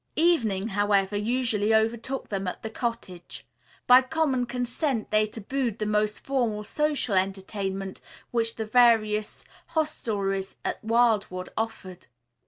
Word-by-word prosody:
Evening, 230 Hz, -, +2 dB
however, 205 Hz, -1 st, +1 dB
usually 220 Hz, -1 st, +1 dB
overtook 230 Hz, +4 st, -1 dB
them 195 Hz, -2 st, -3 dB
at 180 Hz, -, -5 dB
the 220 Hz, -, -5 dB
cottage. 225 Hz, -7 st, -5 dB, 0.4 s
By 250 Hz, +1 st, +8 dB
common 265 Hz, -3 st, 0 dB
consent 245 Hz, 0 st, -2 dB
they 215 Hz, 0 st, +3 dB
tabooed 230 Hz, +2 st, -3 dB
the 215 Hz, -, -2 dB
more 210 Hz, 0 st, +2 dB
formal 220 Hz, -1 st, -2 dB
social 290 Hz, 0 st, -1 dB
entertainment 195 Hz, 0 st, -2 dB, 0.3 s
which 230 Hz, -1 st, 0 dB
the 220 Hz, -, -3 dB
various 215 Hz, -2 st, +3 dB, 0.3 s
hostelries 200 Hz, -11 st, -1 dB
at -, -, -3 dB
Wildwood 220 Hz, -5 st, +1 dB
offered. 195 Hz, -5 st, -5 dB
220 Hz, 120 wpm, -26 LUFS, 205-245 Hz, 0.4 s, By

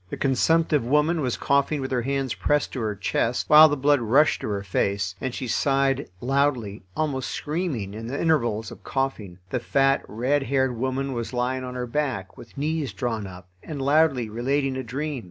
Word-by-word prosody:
The -, -, -5 dB
consumptive 150 Hz, +2 st, +2 dB
woman 150 Hz, +6 st, +2 dB
was 125 Hz, -4 st, -1 dB
coughing 140 Hz, +2 st, +1 dB
with 130 Hz, -1 st, -4 dB
her 125 Hz, -2 st, +1 dB
hands 135 Hz, 0 st, -1 dB
pressed 145 Hz, 0 st, 0 dB
to 130 Hz, -, -3 dB
her 110 Hz, -3 st, -2 dB
chest, 115 Hz, +4 st, -1 dB
while 155 Hz, +1 st, +10 dB
the 145 Hz, -, -1 dB
blood 140 Hz, 0 st, +3 dB
rushed 135 Hz, +7 st, +3 dB
to -, -, -4 dB
her 100 Hz, -2 st, -2 dB
face, 100 Hz, 0 st, -1 dB
and 130 Hz, -, -2 dB
she 125 Hz, +1 st, -5 dB
sighed 135 Hz, +3 st, +1 dB
loudly, 125 Hz, -5 st, 0 dB, 0.2 s
almost 140 Hz, -4 st, -1 dB
screaming, 150 Hz, -, -3 dB
in 110 Hz, +2 st, -7 dB
the 135 Hz, +4 st, -4 dB
intervals 120 Hz, -9 st, +1 dB
of -, -, -12 dB
coughing. 125 Hz, -10 st, -3 dB
The 125 Hz, -, 0 dB
fat, 135 Hz, +3 st, +2 dB
red 130 Hz, +7 st, 0 dB
haired 130 Hz, -2 st, 0 dB
woman 130 Hz, +3 st, -2 dB
was 120 Hz, 0 st, -4 dB
lying 125 Hz, +1 st, -1 dB
on 125 Hz, 0 st, -6 dB
her 125 Hz, -1 st, -3 dB
back, 125 Hz, -7 st, -3 dB
with 115 Hz, -, -14 dB
knees 150 Hz, -4 st, -2 dB
drawn 110 Hz, 0 st, -3 dB
up, 90 Hz, 0 st, -11 dB
and 150 Hz, -3 st, -7 dB
loudly 140 Hz, -3 st, +3 dB
relating 135 Hz, +5 st, -1 dB
a 130 Hz, -, -2 dB
dream. 140 Hz, +4 st, -4 dB
130 Hz, 190 wpm, -25 LUFS, 115-145 Hz, 0.2 s, while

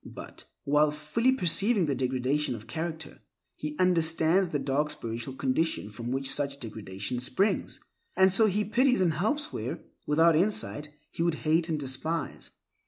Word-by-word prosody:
But, -, -, -10 dB, 0.2 s
while 150 Hz, +2 st, +3 dB
fully 150 Hz, -, +1 dB
perceiving 200 Hz, -2 st, +2 dB
the 145 Hz, -, 0 dB
degradation 130 Hz, +2 st, 0 dB
of 110 Hz, -1 st, -10 dB
character, 160 Hz, -1 st, -5 dB, 0.4 s
he 150 Hz, 0 st, -5 dB
understands 170 Hz, 0 st, +2 dB
the 150 Hz, -, -1 dB
dark 145 Hz, +2 st, 0 dB
spiritual 120 Hz, -1 st, -5 dB
condition 130 Hz, -4 st, -1 dB
from 115 Hz, +3 st, -6 dB
which 135 Hz, +1 st, -1 dB
such 140 Hz, -1 st, -2 dB
degradation 110 Hz, 0 st, -5 dB
springs, 130 Hz, -, 0 dB, 0.4 s
and 190 Hz, 0 st, +5 dB
so 220 Hz, +3 st, +6 dB
he 210 Hz, +1 st, 0 dB
pities 250 Hz, +2 st, +3 dB
and 170 Hz, -3 st, +3 dB
helps 285 Hz, -, -1 dB
where, -, -, -4 dB, 0.3 s
without 160 Hz, +2 st, +4 dB
insight, 150 Hz, -, 0 dB, 0.2 s
he -, -, -5 dB
would 170 Hz, -1 st, +2 dB
hate 160 Hz, +2 st, +2 dB
and 155 Hz, -2 st, -1 dB
despise. 145 Hz, +4 st, -3 dB
155 Hz, 155 wpm, -28 LUFS, 135-180 Hz, 0.4 s, so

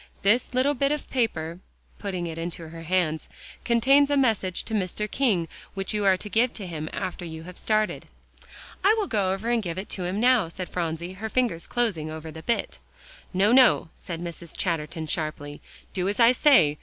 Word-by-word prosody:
This 235 Hz, +5 st, +2 dB
little 265 Hz, +3 st, +3 dB
bit 275 Hz, +1 st, +1 dB
of 300 Hz, -1 st, -2 dB
paper," 170 Hz, -10 st, -1 dB, 0.4 s
putting 185 Hz, -4 st, -3 dB
it 165 Hz, -1 st, -5 dB
into 165 Hz, -1 st, -5 dB
her 165 Hz, 0 st, -9 dB
hands, 165 Hz, -2 st, 0 dB, 0.3 s
"contains 270 Hz, +5 st, +4 dB
a 285 Hz, -, +2 dB
message 220 Hz, -9 st, +1 dB
to 225 Hz, -, -7 dB
Mr. 205 Hz, 0 st, -1 dB
King, 215 Hz, -9 st, +1 dB, 0.3 s
which 195 Hz, +1 st, -2 dB
you 210 Hz, -1 st, 0 dB
are 190 Hz, -1 st, +5 dB
to 210 Hz, -, -7 dB
give 230 Hz, +4 st, +2 dB
him 165 Hz, -7 st, -5 dB
after 185 Hz, -2 st, -4 dB
you 160 Hz, -1 st, -7 dB
have 180 Hz, +1 st, -10 dB
started." 215 Hz, +1 st, 0 dB, 0.8 s
"I 415 Hz, +3 st, +6 dB
will 425 Hz, -, +1 dB
go 200 Hz, -, +1 dB
and 230 Hz, +4 st, 0 dB
give 175 Hz, -3 st, -4 dB
it 190 Hz, -, -5 dB
to 185 Hz, -, -3 dB
him 185 Hz, +3 st, -2 dB
now," 245 Hz, -5 st, +4 dB
said 180 Hz, +2 st, -7 dB
Phronsie, 170 Hz, +1 st, -3 dB
her 220 Hz, +4 st, -5 dB
fingers 225 Hz, -9 st, 0 dB
closing 205 Hz, -11 st, -1 dB
over 160 Hz, 0 st, -7 dB
the 160 Hz, -, -9 dB
bit. 235 Hz, +8 st, -2 dB, 0.5 s
"No, 195 Hz, +3 st, +3 dB
no," 250 Hz, -9 st, +6 dB
said 170 Hz, -3 st, -6 dB
Mrs. 170 Hz, -1 st, -7 dB
Chatterton 165 Hz, -2 st, -2 dB
sharply, 150 Hz, -2 st, -4 dB, 0.3 s
"do 185 Hz, 0 st, 0 dB
as 205 Hz, -, -2 dB
I 230 Hz, 0 st, +7 dB
say. 245 Hz, -, +5 dB
190 Hz, 190 wpm, -26 LUFS, 165-235 Hz, 0.8 s, I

